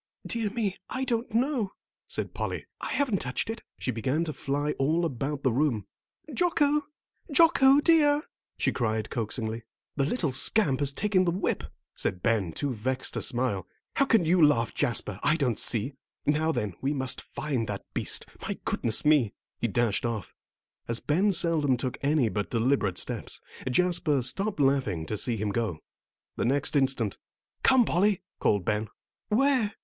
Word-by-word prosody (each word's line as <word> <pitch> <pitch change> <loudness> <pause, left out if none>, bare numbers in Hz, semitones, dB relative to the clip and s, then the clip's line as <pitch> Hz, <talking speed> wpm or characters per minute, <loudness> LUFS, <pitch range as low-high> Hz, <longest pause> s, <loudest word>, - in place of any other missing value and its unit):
"Dear 225 -3 -1
me, 205 -3 -2
I 260 0 -2
don't 235 -1 -1
know," 235 -3 0 0.3
said - - -4
Polly. - - -3
"I - - -4
haven't 255 -10 0
touched 125 - -2
it," 225 - -6 0.2
and - - -15
she 125 - +1
began 130 +8 0
to 155 -2 -3
fly 145 +2 -1
all 160 +5 +2
about 140 0 -3
the 130 - +3
room. 125 -7 +1 0.5
"Jocko, 295 -1 +2 0.4
Jocko 285 -3 +6
dear," 295 -2 +4 0.3
she - - +1
cried 110 -3 -1
coaxingly. 115 0 -3 0.4
"The 140 -1 +2
little 165 - 0
scamp 135 - +2
has 145 -1 +3
taken 195 +4 +2
the 170 - +2
whip," 185 +3 -1 0.3
said 90 - -2
Ben, 110 -7 +1
too 140 - -2
vexed 130 +4 -3
to - - -2
smile. 120 -7 -1 0.3
"How 275 - +5
you - - -14
can 180 -6 +4
laugh, 145 -7 +4
Jasper, 105 -4 +1
I 150 +2 +3
don't 130 -8 0
see. 120 +4 +3 0.3
Now 155 +2 +2
then, 105 - -2
we 140 +3 0
must 130 -1 0
find 130 -7 -3
that 100 -1 -5
beast. - - -2 0.2
My - - -3
goodness 115 +5 +1
me!" 145 -8 +4 0.2
He 120 - 0
dashed 115 -1 0
off. 115 -6 -3 0.5
As 115 0 +1
Ben 185 +8 +2
seldom 160 -7 +2
took 125 0 -3
any 140 -3 +2
but 105 -2 -2
deliberate 115 -6 +1
steps, - - -3 0.3
Jasper 170 -2 +2
stopped 195 - 0
laughing 135 - +1
to 110 - -3
see 115 +2 0
him 105 0 -1
go. 110 -6 -1 0.6
The - - 0
next 140 +4 +1
instant, 130 -7 +1 0.4
"Come, 260 -3 +5
Polly!" 195 +1 +2 0.2
called 100 -4 +1
Ben. 105 +1 0 0.4
"Where?" 235 -2 +2
140 Hz, 165 wpm, -28 LUFS, 115-195 Hz, 0.6 s, Jocko